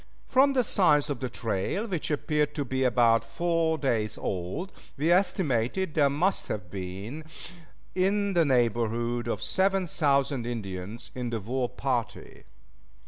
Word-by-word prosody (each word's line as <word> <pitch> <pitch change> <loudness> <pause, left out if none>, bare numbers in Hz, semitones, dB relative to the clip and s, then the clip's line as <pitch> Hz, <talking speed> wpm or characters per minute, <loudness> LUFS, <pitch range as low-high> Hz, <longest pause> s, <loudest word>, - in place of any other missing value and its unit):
From 275 +2 +4
the 255 -2 +3
size 150 -9 +3
of 135 - -3
the 130 - -3
trail, 115 - -2
which 180 -8 -3
appeared 150 0 0
to 145 -3 -2
be 130 +1 -1
about 120 -2 +4
four 165 +6 0
days 115 -7 -1
old, 95 - -4 0.3
we 155 +5 +2
estimated 180 - +1
that - - -17
there 145 -3 +4
must 175 +8 0
have 90 -4 -5
been 100 +10 -6 0.7
in 200 +2 +1
the 170 -2 +4
neighborhood 120 -2 +1
of 110 -2 -2
seven 190 0 +1
thousand 140 -5 +1
Indians 100 -2 -6
in 125 -2 -3
the 115 -1 -2
war 125 +4 -2
party. 125 -2 -3
135 Hz, 145 wpm, -28 LUFS, 115-170 Hz, 0.7 s, From